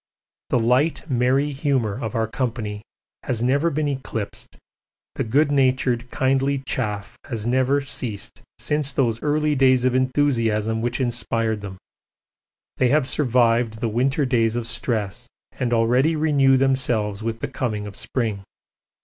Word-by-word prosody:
The - - +2
light, 125 +8 +1
merry 130 +4 +2
humour 135 -6 0
of 110 -1 -5
our 115 0 +1
company 110 -3 -3 0.4
has 120 -3 -2
never 140 +6 +2
been 155 -1 -1
eclipsed, 130 -7 -5 0.6
the - - -2
good 145 +6 +2
natured, 130 -3 +1
kindly 135 +1 +1
chaff 105 -6 -3
has 110 -3 -5
never 130 +3 +2
ceased 120 -6 -6 0.2
since 150 -2 -1
those 115 -3 0
early 150 0 +1
days 130 -2 +4
of 130 - +2
enthusiasm 115 -5 +1
which 120 +3 -2
inspired 115 -3 -1
them 95 -2 -7 1.0
they 130 - +3
have 145 +2 +3
survived 120 -5 +2
the 115 - -1
winter 135 +6 +1
days 115 -3 +1
of 120 -1 -2
stress 110 -3 -3 0.2
and 125 -2 -3
already 125 +7 +3
renew 140 -4 +3
themselves 125 -6 +1
with 115 0 -3
the - - -3
coming 115 -5 -3
of 100 -1 -8
spring. 110 -6 -2
125 Hz, 140 wpm, -22 LUFS, 115-135 Hz, 1.0 s, days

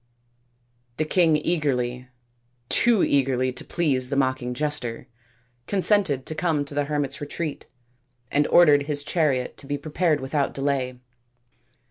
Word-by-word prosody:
The 155 - 0
king 165 -1 +3
eagerly 130 -6 -1 0.6
too 235 -5 +3
eagerly 130 -2 +1
to - - -5
please 135 -7 -1
the 140 - -2
mock 130 -1 +1
ing 125 0 -4
jester 125 -5 -3 0.6
consented 190 -8 +2
to - - -4
come 155 -2 0
to 140 - -6
the 145 0 0
hermits' 145 -2 -2
retreat, 150 +1 -5 0.7
and 145 +1 +2
ordered 145 -4 +5
his 145 -1 -1
chariot 145 -5 0
to 140 - -9
be 145 0 -2
prepared 155 +1 0
without 140 +1 -2
delay. 135 -2 -1
145 Hz, 135 wpm, -24 LUFS, 130-155 Hz, 0.7 s, ordered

